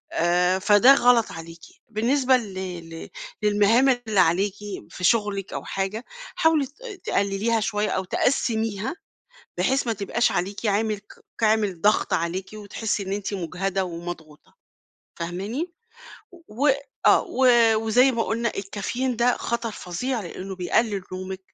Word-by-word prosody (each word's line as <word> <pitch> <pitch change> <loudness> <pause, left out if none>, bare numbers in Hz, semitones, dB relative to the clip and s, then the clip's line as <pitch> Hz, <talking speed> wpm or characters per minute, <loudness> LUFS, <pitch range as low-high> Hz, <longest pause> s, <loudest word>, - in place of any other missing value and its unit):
آآ، 180 +2 +2
فده 205 +7 +7
غلط 245 -3 +4
عليكِ. 165 0 -10 0.3
بالنسبة 255 +4 +2
ل 210 -5 -7 0.4
ل 165 0 -9 0.3
للمهام 210 +5 +4
اللي 235 -5 +1
عليكِ 185 +3 +3 0.4
في 180 - -9
شغلِك 200 -1 +1
أو - - -4
حاجة، 195 +4 -3 0.3
حاولِي 320 -3 +3
ت - - -23 0.3
تقلّليها 200 +3 0
شويّة، 210 0 -1
أو 190 - -1
تقسّميها، 225 - 0 0.6
بحيث 265 -1 +1
ما 230 - +1
تبقاش 220 +3 0
عليكِ 195 +4 -3
عامل 210 +1 +1 0.4
ك 225 - -3
عامل 210 -5 +2
ضغْط 210 +1 +2
عليكِ، 175 +3 -1
وتحسّي 210 0 -3
إن 190 - -3
أنتِ 205 0 -3
مُجهَدة 190 +1 -2
ومضغوطة. 170 -3 -9 0.6
فاهماني؟ 200 - -4 0.8
و 265 +8 +1 0.4
آه، - - +6
و 260 - 0 0.3
وزي 235 +4 +4
ما 230 -1 0
قُلنا 230 0 -1
الكافيين 220 +6 -3
ده 240 +1 +2
خطر 235 -1 -2
فظيع 220 +6 -3
لأنّه 190 0 -7
بيقلّل 200 +2 0
نومِك، 185 +1 -5
210 Hz, 135 wpm, -24 LUFS, 190-235 Hz, 0.8 s, فده